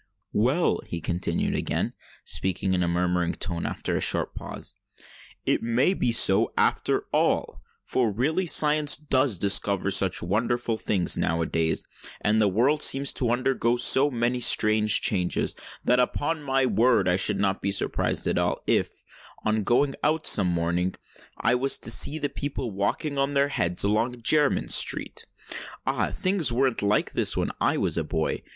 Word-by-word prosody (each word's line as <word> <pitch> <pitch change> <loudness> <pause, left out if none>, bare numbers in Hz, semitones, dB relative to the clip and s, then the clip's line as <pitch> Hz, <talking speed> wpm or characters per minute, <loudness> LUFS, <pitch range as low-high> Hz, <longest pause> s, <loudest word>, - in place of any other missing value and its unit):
"Well," 130 +11 +1
he 85 - -5
continued, 85 +2 -2
again - - -2 0.3
speaking 95 0 0
in 90 - 0
a 85 - 0
murmuring 90 0 -1
tone, 85 -3 -3
after - - -4
a - - -2
short - - +1
pause, - - -8 0.7
"it - - 0
may 120 +10 +1
be 125 - -1
so, 95 -4 +4
after - - +1
all! - - 0 0.2
For 120 -4 -1
really 155 - -1
science 150 -2 +4
does 130 -7 0
discover 100 +1 +1
such 95 -1 +2
wonderful 115 +5 -1
things 95 -5 -1
now 85 0 -1
a - - -2
days, 80 0 -1 0.4
and 110 +1 +1
the 105 - +3
world 125 +10 +1
seems 135 0 +3
to 125 - 0
undergo 120 -1 0
so 130 +4 +5
many 120 -1 -1
strange 110 -2 +4
changes, 90 -4 0 0.3
that 125 +1 +2
upon 145 +5 -1
my 135 -2 0
word 115 -5 +2
I 90 - +2
should 95 +1 +1
not 100 -1 -1
be 100 - -2
at 100 - +1
all - - +5
surprised - - -1 0.4
if, - - -1 0.4
on 110 0 0
going 135 +6 +1
out 155 +1 0
some 100 -3 +5
morning, 85 +1 -1 0.4
I 115 - +1
was 135 +2 +1
to 115 - -1
see 140 +7 +2
the 145 - -2
people 140 -5 -5
walking 135 - -2
on 140 +1 -1
their 140 +1 +2
heads 90 -10 0
along 115 +4 -1
Jermyn 150 +2 +2
Street. - - +1 0.6
Ah! - - -1
things 185 -7 0
weren't 130 0 0
like 105 +1 0
this - - 0
when - - -1
I - - +1
was - - -1
a - - -2
boy! 80 -1 -3
115 Hz, 170 wpm, -25 LUFS, 95-135 Hz, 0.7 s, so